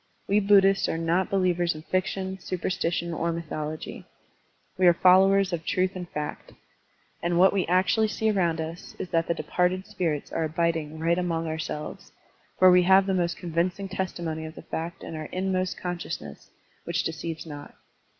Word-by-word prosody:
We 205 Hz, +1 st, +3 dB
Buddhists 195 Hz, -1 st, +4 dB
are -, -, -1 dB
not 170 Hz, +3 st, +1 dB
believers 175 Hz, -3 st, +1 dB
in 155 Hz, -, -9 dB
fiction, 190 Hz, +1 st, -2 dB
supersti 180 Hz, -1 st, -2 dB
tion, 170 Hz, -1 st, -2 dB
or 170 Hz, +1 st, -1 dB
mythology. 155 Hz, -2 st, -5 dB, 0.7 s
We 185 Hz, -1 st, +4 dB
are 175 Hz, -, +6 dB
followers 190 Hz, +1 st, +5 dB
of 165 Hz, -1 st, -2 dB
truth 185 Hz, +2 st, 0 dB
and 180 Hz, -2 st, -6 dB
fact. 150 Hz, 0 st, -6 dB, 0.7 s
And 170 Hz, 0 st, 0 dB
what 190 Hz, +2 st, +6 dB
we 195 Hz, -2 st, 0 dB
actually 185 Hz, +5 st, +3 dB
see 220 Hz, +1 st, 0 dB
around 170 Hz, -5 st, +1 dB
us 160 Hz, +2 st, -6 dB
is 185 Hz, -, -5 dB
that 165 Hz, 0 st, +1 dB
the 170 Hz, -, 0 dB
departed 180 Hz, +2 st, 0 dB
spirits 160 Hz, -7 st, -2 dB
are 165 Hz, -, -1 dB
abiding 160 Hz, -1 st, -1 dB
right 165 Hz, +2 st, +1 dB
among 165 Hz, -2 st, -1 dB
ourselves, 155 Hz, -1 st, -5 dB, 0.5 s
for 185 Hz, 0 st, +7 dB
we 180 Hz, 0 st, +6 dB
have 190 Hz, +2 st, +5 dB
the 195 Hz, -, 0 dB
most 175 Hz, -2 st, 0 dB
convincing 180 Hz, +3 st, -1 dB
testimony 170 Hz, -4 st, -3 dB
of 160 Hz, +1 st, -8 dB
the -, -, -10 dB
fact 170 Hz, +1 st, -5 dB
in -, -, -6 dB
our 155 Hz, 0 st, -5 dB
inmost 185 Hz, +1 st, -1 dB
consciousness 175 Hz, -1 st, -6 dB, 0.3 s
which -, -, -1 dB
deceives 165 Hz, 0 st, -4 dB
not. 145 Hz, -2 st, -9 dB
175 Hz, 170 wpm, -26 LUFS, 165-185 Hz, 0.7 s, for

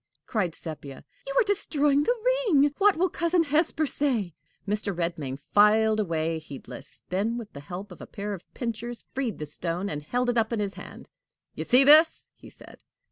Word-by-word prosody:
cried 185 Hz, -7 st, -1 dB
Sepia; 145 Hz, -4 st, -8 dB, 0.2 s
"you -, -, -4 dB
are -, -, +5 dB
destroying 295 Hz, -8 st, +1 dB
the 485 Hz, +11 st, +1 dB, 0.3 s
ring! 290 Hz, -5 st, +4 dB
What 405 Hz, -3 st, +4 dB
will 365 Hz, +3 st, +3 dB
Cousin 340 Hz, 0 st, +1 dB
Hesper 310 Hz, +1 st, +1 dB
say?" 245 Hz, -, -1 dB, 0.3 s
Mr. 205 Hz, -1 st, -2 dB
Redmain 165 Hz, -6 st, -3 dB, 0.2 s
filed 215 Hz, +1 st, +5 dB
away, 165 Hz, -4 st, -1 dB
heedless; 135 Hz, -3 st, -11 dB
then 210 Hz, +6 st, -1 dB
with 225 Hz, -3 st, -8 dB
the 140 Hz, -, -8 dB
help 180 Hz, +8 st, -8 dB
of -, -, -12 dB
a -, -, -9 dB
pair 205 Hz, -1 st, -5 dB
of 185 Hz, -, -10 dB
pincers 235 Hz, 0 st, -4 dB
freed 260 Hz, -5 st, -2 dB
the 150 Hz, -, -5 dB
stone, 170 Hz, +5 st, -4 dB
and 150 Hz, -1 st, -4 dB
held 245 Hz, +11 st, -1 dB
it 240 Hz, -, +1 dB
up 220 Hz, +1 st, 0 dB
in 230 Hz, -, -1 dB
his 200 Hz, -1 st, -2 dB
hand. -, -, -11 dB, 0.5 s
"You -, -, -5 dB
see 250 Hz, +2 st, +6 dB
this?" 310 Hz, +3 st, +5 dB
he -, -, -14 dB
said. -, -, -15 dB
220 Hz, 190 wpm, -26 LUFS, 175-285 Hz, 0.5 s, see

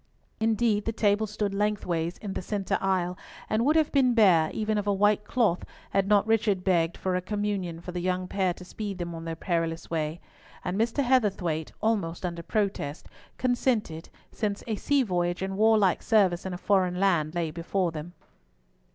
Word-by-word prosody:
Indeed 220 Hz, -1 st, +1 dB
the 225 Hz, -, 0 dB
table 215 Hz, -1 st, +1 dB
stood 210 Hz, -1 st, -2 dB
lengthways 180 Hz, -5 st, -1 dB
in 200 Hz, -3 st, -6 dB
the -, -, -3 dB
centre 195 Hz, 0 st, -2 dB
aisle, 180 Hz, -2 st, 0 dB, 0.3 s
and 220 Hz, +2 st, +1 dB
would 300 Hz, +5 st, +3 dB
have 315 Hz, -2 st, +3 dB
been 255 Hz, -4 st, +3 dB
bare, 180 Hz, -8 st, +5 dB
even 215 Hz, -1 st, -1 dB
of 205 Hz, -, -4 dB
a -, -, +3 dB
white 205 Hz, +1 st, +3 dB
cloth, 215 Hz, -6 st, +1 dB, 0.3 s
had 195 Hz, 0 st, +1 dB
not 205 Hz, 0 st, +4 dB
Richard 215 Hz, -4 st, +1 dB
begged 170 Hz, -3 st, +1 dB
for 185 Hz, -1 st, -1 dB
a 180 Hz, -, 0 dB
Communion 200 Hz, -4 st, -2 dB
for 180 Hz, -, -7 dB
the 180 Hz, -, -4 dB
young 185 Hz, +1 st, -1 dB
pair 190 Hz, -1 st, 0 dB
to 180 Hz, -, -11 dB
speed 200 Hz, 0 st, -5 dB
them 175 Hz, -1 st, -4 dB
on 165 Hz, 0 st, -7 dB
their 165 Hz, 0 st, -3 dB
perilous 165 Hz, -1 st, -2 dB
way, 160 Hz, 0 st, -2 dB, 0.5 s
and 180 Hz, -, -1 dB
Mr. 230 Hz, +6 st, +1 dB
Heatherthwayte—almost 195 Hz, -, 0 dB
under 170 Hz, -1 st, -4 dB
protest—consented, 205 Hz, -, -2 dB, 0.2 s
since 205 Hz, -2 st, -2 dB
a 220 Hz, -, -2 dB
sea 280 Hz, +5 st, +2 dB
voyage 175 Hz, -3 st, -1 dB
and 190 Hz, 0 st, -3 dB
warlike 215 Hz, -3 st, +4 dB
service 190 Hz, -5 st, +2 dB
in 185 Hz, -, -4 dB
a -, -, -5 dB
foreign 185 Hz, -2 st, +1 dB
land 175 Hz, -5 st, +2 dB
lay 165 Hz, -2 st, -1 dB
before 175 Hz, +2 st, -1 dB
them. 160 Hz, +2 st, -7 dB
195 Hz, 175 wpm, -27 LUFS, 175-215 Hz, 0.5 s, bare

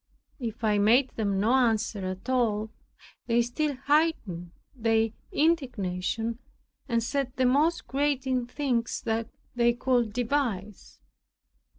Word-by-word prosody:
If 235 Hz, -2 st, -5 dB
I 210 Hz, -2 st, +3 dB
made 240 Hz, +6 st, +4 dB
them 200 Hz, -3 st, -1 dB
no 220 Hz, +5 st, +2 dB
answer 225 Hz, -5 st, +1 dB
at 185 Hz, +5 st, -6 dB
all, 220 Hz, -4 st, +1 dB, 0.6 s
they 235 Hz, 0 st, +3 dB
still 285 Hz, +5 st, -1 dB
heightened 285 Hz, -, +1 dB, 0.3 s
their 225 Hz, -2 st, +2 dB, 0.2 s
indignation, 230 Hz, -, 0 dB, 0.5 s
and 230 Hz, -1 st, +1 dB
said 270 Hz, +1 st, -1 dB
the 260 Hz, -, +2 dB
most 295 Hz, +7 st, +2 dB
grating 260 Hz, -2 st, 0 dB
things 245 Hz, -3 st, -2 dB, 0.5 s
they 240 Hz, 0 st, +3 dB
could 240 Hz, -2 st, +1 dB
devise. 225 Hz, -5 st, -2 dB
240 Hz, 110 wpm, -27 LUFS, 220-265 Hz, 0.6 s, made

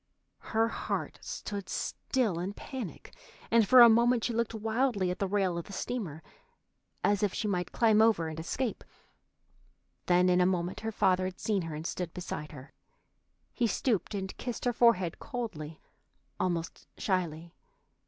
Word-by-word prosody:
Her 225 Hz, +1 st, +4 dB
heart -, -, -3 dB
stood 200 Hz, -2 st, -6 dB
still 225 Hz, -10 st, -1 dB
in 185 Hz, +3 st, -3 dB
panic, 250 Hz, -3 st, -7 dB, 0.4 s
and 230 Hz, -3 st, +5 dB
for 255 Hz, +3 st, +9 dB
a 235 Hz, -, +11 dB
moment 235 Hz, +1 st, +4 dB
she 240 Hz, -, 0 dB
looked 230 Hz, 0 st, -1 dB
wildly 220 Hz, -3 st, 0 dB
at 180 Hz, -, -5 dB
the 195 Hz, -, 0 dB
rail 190 Hz, -3 st, 0 dB
of 170 Hz, -, -7 dB
the 200 Hz, -, -10 dB
steamer, 185 Hz, -7 st, -4 dB, 0.8 s
as 205 Hz, 0 st, +2 dB
if 205 Hz, -3 st, 0 dB
she 215 Hz, -, -1 dB
might 180 Hz, -3 st, -1 dB
climb 220 Hz, -2 st, +4 dB
over 220 Hz, -8 st, +3 dB
and 160 Hz, 0 st, -6 dB
escape. 225 Hz, +8 st, -3 dB, 1.2 s
Then 180 Hz, 0 st, +4 dB
in 180 Hz, 0 st, +4 dB
a 180 Hz, -, +4 dB
moment 180 Hz, -1 st, -1 dB
her 225 Hz, +1 st, -3 dB
father 185 Hz, -3 st, +2 dB
had 185 Hz, 0 st, -5 dB
seen 205 Hz, -3 st, 0 dB
her 165 Hz, -2 st, -5 dB
and 155 Hz, +2 st, -6 dB
stood 175 Hz, -1 st, -4 dB
beside 165 Hz, -4 st, -5 dB
her. 135 Hz, -2 st, -12 dB, 0.8 s
He 240 Hz, -, +1 dB
stooped 215 Hz, -1 st, 0 dB
and 190 Hz, -1 st, -4 dB
kissed 245 Hz, 0 st, -5 dB
her 245 Hz, -, +2 dB
forehead 220 Hz, -8 st, +3 dB
coldly, 165 Hz, -11 st, -5 dB, 0.6 s
almost 170 Hz, -2 st, -2 dB
shyly. 170 Hz, -5 st, -2 dB
195 Hz, 165 wpm, -30 LUFS, 175-225 Hz, 1.2 s, a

